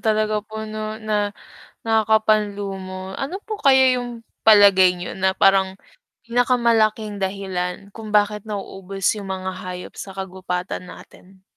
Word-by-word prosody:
talaga 215 -2 +1
po 220 +1 -7
na 215 0 -5 0.9
nakakapanlumo. 205 -4 0
Ano 325 +9 -4
po 435 - -4
kaya 265 -5 +5
yung 245 -2 -5 0.2
palagay 200 -4 +7
niyo 175 - -6
na 190 0 +2
parang 190 0 +3 0.4
pinakamalaking 230 -3 +1
dahilan 190 -1 -3
kung 215 0 -9
bakit 210 0 +2
nauubos 195 -2 -7 0.2
yung 200 -2 -7
mga 190 0 -4
hayop 180 0 -7
sa 195 - -7
kagubatan 185 -1 -4
natin? 190 +1 -15
205 Hz, 120 wpm, -22 LUFS, 190-220 Hz, 0.9 s, palagay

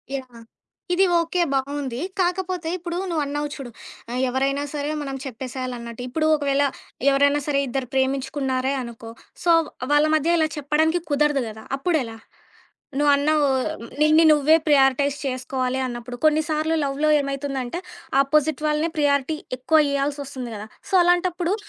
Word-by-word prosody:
Yeah! 250 -4 -8 0.5
ఇది 380 +2 +4
okay, 335 +1 0
బావుంది. 270 -2 -2 0.2
కాకపోతే 360 -2 -1
ఇప్పుడు 345 0 -5
నువ్వన్నావు 295 -2 -1
చూడు. 265 -4 -8 0.4
ఆ! - - -4 0.2
ఎవరైనా 275 +2 0
సరే 290 +1 -2
మనం 275 -2 -4
చెప్పేసేయాలన్నట్టు. 250 -2 -6
ఇప్పుడు 310 +5 -1
ఒకవేళ 285 -1 +1 0.5
ఎవరైనా 285 +1 +3
సరే! 285 -2 +2
ఇద్దరు 260 +1 -3
ప్రేమించుకున్నారే 265 0 0
అనుకో. 235 -2 -8 0.3
సో 345 - +4 0.4
వాళ్ళ 295 +1 +5
మధ్య 325 +3 +2
ఇలా 315 -1 +3
చెప్పడానికి 310 +4 +1
కుదరదు 290 -2 +2
కదా! 220 0 -10
అప్పుడెలా? 270 -7 -1 0.8
నువ్వన్నావు 290 +1 +3 0.5
నిన్ని 310 +2 +6
నువ్వే 300 +1 +5
ప్రియారిటైజ్ 280 0 +3
చేసుకోవాలి 255 0 -2
అన్నప్పుడు. 240 0 -6
కొన్నిసార్లు 310 +1 +2
లవ్‌లో 285 +2 0
ఏమైతుందంటే 275 0 -3 0.4
ఆపోజిట్ 300 +1 +1
వాళ్ళనే 300 +2 +1
ప్రియారిటీ 290 +1 +1 0.2
ఎక్కువ 260 +5 +3
ఇయాల్సి 280 +1 -1
వస్తుంది 260 -3 -7
కదా! 210 0 -7 0.2
సో - - -10
అలాంటప్పుడు 355 0 +1
285 Hz, 125 wpm, -23 LUFS, 265-310 Hz, 0.8 s, నిన్ని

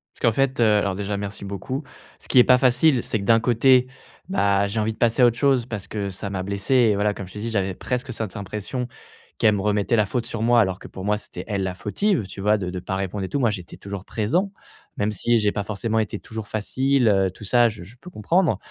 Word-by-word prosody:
Parce - - -17
qu'en 115 - +4
fait, 135 -1 +1
heu, - - +5
alors 100 -2 0
déjà, 100 +1 -3
merci 100 0 -6
beaucoup. 100 - -4 0.4
Ce - - -11
qui 130 - +5
est - - +9
pas 125 0 +5
facile, 130 +1 +3
c'est 110 - -2
que - - -5
d'un 115 +2 +5
côté, 125 +2 +4 0.4
bah 100 - +2
j'ai 105 +3 -2
envie 110 +1 0
de - - -20
passer 120 +2 +2
à - - +8
autre 120 -1 +2
chose 135 -4 +2
parce 105 -5 -6
que 100 -2 -3
ça 100 +2 -5
m'a 95 -1 -3
blessé 100 +5 -2
et 120 -5 +4
voilà, 105 +1 +1
comme 100 -2 -8
je 90 - -14
t'ai 105 - -7
dit 115 +2 -3
j'avais 100 -4 -1
presque 125 +5 -3
cette 110 -4 -5
impression 105 +5 -4 0.5
qu'elle 110 -2 +4
me 100 - -2
remettait 105 +2 +1
la 105 -2 +3
faute 120 +2 -2
sur 115 -1 -5
moi 120 +1 +4
alors 95 -4 +1
que - - -10
pour 95 - -8
moi, 105 0 +1
c'était 90 -3 -9
elle 100 -3 -1
la 95 -1 -3
fautive, 150 - 0
tu 95 - -9
vois? 105 +2 +3
De 95 -3 -4
de 90 - -4
pas 95 +2 -4
répondre 95 +1 -3
et 95 - -4
tout, 145 - -1
moi, 120 -4 +2
j'étais 90 -4 -8
toujours 100 -1 -7
présent, 170 - 0 0.5
même 105 +1 0
si 115 +3 +1
j'ai 105 -1 +2
pas 100 - -3
forcément 110 +2 -2
été 110 - -2
toujours 110 -2 -8
facile, 130 +5 +1
heu, 95 -2 +3
tout 100 - -13
ça, 120 +3 +4
je 105 -5 -9
je 100 +7 -14
peux 180 - -10
comprendre, 175 - +1
105 Hz, 265 wpm, -23 LUFS, 100-120 Hz, 0.5 s, est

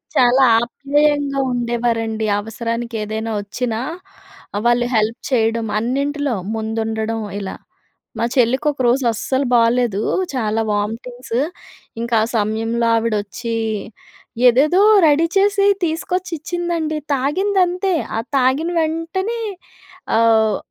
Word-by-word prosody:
చాలా 250 +2 +5 0.2
ఆప్యాయంగా 285 +3 0
ఉండేవారండి. 235 -2 -1
అవసరానికి 230 +2 -4
ఏదైనా 220 +1 -4
వచ్చినా 220 +2 -3 0.9
వాళ్ళు 240 0 +3
హెల్ప్ 220 +2 +1
చేయడం 225 -2 +1
అన్నింటిలో 280 +3 -1 0.2
ముందుండడం 220 0 -2 0.2
ఇలా. 195 -2 -5 0.6
మా 230 - +1
చెల్లికి 255 +3 +2
ఒకరోజు 260 -1 +1
అస్సలు 260 +5 -1
బాలేదు. 230 -3 +2 0.3
చాలా 225 -2 0
వామిటింగ్స్. 230 +4 -3 0.6
ఇంకా 235 0 -1
ఆ - - +1
సమయంలో 225 +2 0
ఆవిడ 225 -1 0
వచ్చి 230 +3 -5 0.9
ఏదేదో 285 +9 +4 0.3
రెడీ 300 +2 +4
చేసి 400 0 +3 0.2
తీసుకొచ్చి 360 +3 -2
ఇచ్చిందండి. 335 -1 -2 0.2
తాగింది 370 +10 0
అంతే. 360 +2 -1 0.2
ఆ - - +1 0.2
తాగిన 265 +6 +2
వెంటనే 330 +8 -2 0.8
ఆహ్ 220 -1 +3
240 Hz, 100 wpm, -19 LUFS, 225-290 Hz, 0.9 s, చాలా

